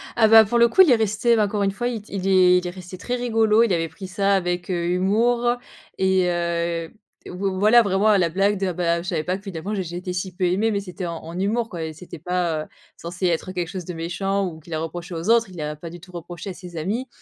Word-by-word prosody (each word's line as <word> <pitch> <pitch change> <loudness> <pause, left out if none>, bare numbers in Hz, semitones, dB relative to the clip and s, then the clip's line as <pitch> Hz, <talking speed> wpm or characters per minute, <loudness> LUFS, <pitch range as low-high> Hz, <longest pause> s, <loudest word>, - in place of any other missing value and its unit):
Ah 225 -2 +5
bah, 225 0 +9
pour 235 +4 0
le 235 0 +6
coup 235 - +5
il 365 - +7
y - - +6
est - - +7
resté, 220 +2 +2
bah, 215 -2 +3
encore 205 0 -1
une 195 - +1
fois 240 +5 -3
il 235 -3 -3
t 205 - -16
il 190 -1 -2
est 185 -1 +5
il 180 0 -2
est - - -2
resté 180 0 -9
très 245 +6 -3
rigolo. 225 -2 +3
Il 225 -5 +1
avait 165 -1 -1
pris 185 +4 -9
ça 200 +1 +1
avec, 175 -1 -2
heu, 170 -1 -1
humour 230 +7 +2 0.4
et 190 -1 +2
heu, 170 -1 -1
v - - -25 0.4
voi 195 +2 -2
voilà 215 +4 +6
vraiment 200 -1 +1
à 210 -2 +5
la 175 -3 +2
blague 195 +4 +1
de: 195 - 0
«Ah 180 - -2
bah, 170 -1 0
heu, - - -7
je 185 - -5
savais 160 -4 -1
pas 185 +1 -1
que 195 - -17
finalement 195 +1 -5
j 190 - -2
j'étais 180 +1 -5
si 180 0 -4
peu 180 +1 -1
aimé» 200 +6 +1
mais 200 - 0
c'était 190 -1 -6
en 170 -1 -4
en 165 +2 -8
humour 225 +5 0
quoi, 170 -2 -5
et 160 0 -5
c'était 170 +2 -10
pas 170 -1 -1
heu, - - -13 0.3
censé 175 +2 -3
être 175 +2 -1
quelque 180 -2 -3
chose 180 0 -6
de 180 - -6
méchant 195 +4 -2
ou 160 -3 -8
qu'il 160 +1 -11
a 155 - -1
reproché 175 +2 -6
aux 165 +5 -4
autres, 230 -2 +4
il 180 - -12
l'a 150 -1 -4
pas 165 +3 -9
du 175 +1 -10
tout 180 +2 -15
reproché 175 +3 -7
à - - -7
ses 175 -1 -11
amis. 215 +11 -2
185 Hz, 290 wpm, -23 LUFS, 175-210 Hz, 0.4 s, bah